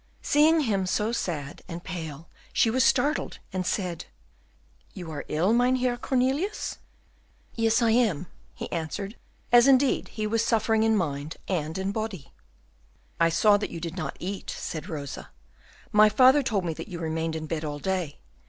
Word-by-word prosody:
Seeing 310 +2 +4
him 200 -8 0
so 210 +4 0
sad 150 -11 -3
and 170 0 -7
pale, 165 -4 -6 0.2
she 225 - +3
was 255 +2 +3
startled, 275 +3 +1 0.2
and 185 -1 -2
said, 180 -5 -2 0.9
"You 175 -3 -7
are 145 -2 -6
ill, 175 +8 +2
Mynheer 250 +1 +2
Cornelius?" 265 - -1 0.7
"Yes, 225 +1 +2
I 225 - +4
am," 215 -9 +2 0.3
he - - -5
answered, 175 +6 -4 0.4
as 240 +1 +7
indeed 270 0 +4
he 215 -1 -4
was 225 +1 +1
suffering 225 -1 +2
in 220 0 +3
mind 150 -3 -3
and 160 -3 -2
in 190 +1 -1
body. 210 -8 -5 0.9
"I 165 0 +5
saw 205 +5 +4
that 205 - -3
you 170 - -6
did 165 0 -5
not 180 - -4
eat," 195 +2 -5
said 160 +4 -5
Rosa; 145 -5 -6 0.6
"my 215 0 +6
father 260 +6 +6
told 210 -8 -1
me 165 - -1
that - - -8
you 180 -4 -6
remained 160 0 -2
in 155 -1 -4
bed 160 0 -3
all 145 -1 -3
day. 180 -2 -3
195 Hz, 165 wpm, -26 LUFS, 165-235 Hz, 0.9 s, as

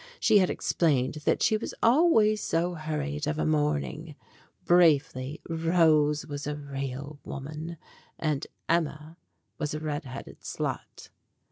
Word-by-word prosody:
She 215 -2 +5
had 185 - +3
explained 150 -3 +1
that - - +2
she 220 - +3
was 215 - -6
always 230 -6 +4
so 170 +2 0
hurried 150 -2 -3
of 150 0 -1
a - - 0
morning. 150 +1 -1 0.5
Briefly, 150 -5 +3
Rose 160 -3 +3
was 145 -1 -6
a 150 - -2
real 140 0 -6
woman, 155 +4 -6 0.4
and 150 -3 -1 0.2
Emma 160 -1 -1 0.4
was 150 -2 -2
a - - -3
red 150 -1 -3
headed 130 +1 -9
slut. - - -5
155 Hz, 130 wpm, -28 LUFS, 145-165 Hz, 0.5 s, She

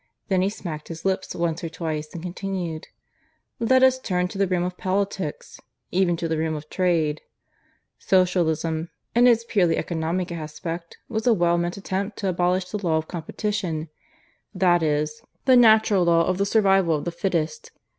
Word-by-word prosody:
Then 190 -2 +2
he 190 - +2
smacked 165 -7 -7
his 165 +1 -8
lips 190 0 -1
once 170 -1 -1
or 165 - -3
twice 155 -2 -4
and 170 - -8
continued.) 180 -3 -4 0.7
"Let 260 +3 +4
us 260 0 +5
turn 180 -7 -1
to 195 - -7
the 195 - +3
realm 180 -1 0
of 180 0 -3
politics 190 -4 -3 0.3
even 175 -2 +2
to 165 - -2
the 160 -1 -1
realm 160 0 -1
of 150 0 -9
trade. 165 -5 +1 0.8
"Socialism, 165 -3 +1 0.2
in 240 +1 +5
its 230 -2 +4
purely 190 -8 +2
economic 170 +2 -2
aspect, 165 +1 -6
was 220 0 -2
a 235 - +5
well 175 -2 +2
meant 175 +2 -2
attempt 195 +1 -3
to 195 - -1
abolish 180 +1 +1
the 210 -1 -4
law 160 -3 +2
of 160 0 -3
competition 170 -2 -3 0.7
that 175 -2 +3
is, 150 0 -1 0.2
the 260 -2 +6
natural 220 -5 +5
law 170 -1 +4
of 185 0 -1
the 200 - +1
Survival 195 -5 +3
of 145 - -4
the 175 - -2
Fittest. 170 -4 -2
180 Hz, 175 wpm, -24 LUFS, 165-195 Hz, 0.8 s, the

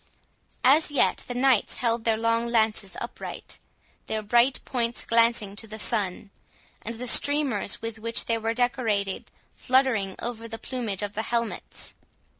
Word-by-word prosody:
As 290 +5 +5
yet 290 -3 +2
the 245 - -4
knights 255 -3 +3
held 230 -1 -1
their 225 -1 +3
long 230 +1 +1
lances 220 -5 0
upright, 235 - -7 0.5
their 220 0 -2
bright 240 +5 +3
points 240 -2 -2
glancing 230 -3 +2
to 225 - -3
the 220 0 -7
sun, 205 -3 -1 0.5
and 230 +2 -6
the 245 +2 -6
streamers 265 -7 +2
with 225 -1 -5
which 230 +1 0
they 230 -1 0
were 225 +1 -1
decorated 225 -6 0 0.2
fluttering 250 -7 +1
over 230 -1 -5
the 225 0 -6
plumage 225 -6 -3
of 205 0 -4
the 215 - -2
helmets. 230 0 -4
230 Hz, 150 wpm, -26 LUFS, 215-245 Hz, 0.5 s, As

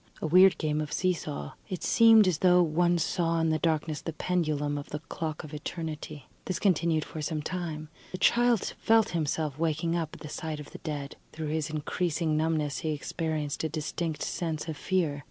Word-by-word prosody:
A - - -3
weird 180 +2 +6
game 150 0 0
of 150 - -5
see 185 0 +2
saw. 70 - -5 0.2
It 185 - -4
seemed 225 -3 +6
as 170 -4 +1
though 180 -1 +5
one 175 +2 +2
saw 165 0 0
in 165 0 +2
the 155 - +1
darkness 155 -2 0
the 165 - -5
pendulum 155 -4 0
of 145 0 -5
the 150 - -3
clock 155 0 -5
of 155 -1 -10
Eternity. 155 -2 -6 0.2
This 185 - -2
continued 165 -5 +2
for 155 - -7
some 150 0 -2
time. 160 -3 -4 0.2
The 185 - -4
child 240 0 +3
felt 225 -1 +4
himself 155 -3 -1
waking 165 +1 0
up 165 -2 -2
at - - -14
the 150 - -7
sight 155 0 -5
of 150 - -10
the - - -9
dead; 145 -3 -5 0.2
through 155 -1 -4
his 155 0 -1
increasing 155 +1 -1
numbness 155 -2 0
he 155 -1 -1
experienced 155 0 -3
a 160 - 0
distinct 155 +1 -3
sense 160 -2 -3
of 160 - -3
fear. 160 -3 0
160 Hz, 195 wpm, -29 LUFS, 150-175 Hz, 0.2 s, weird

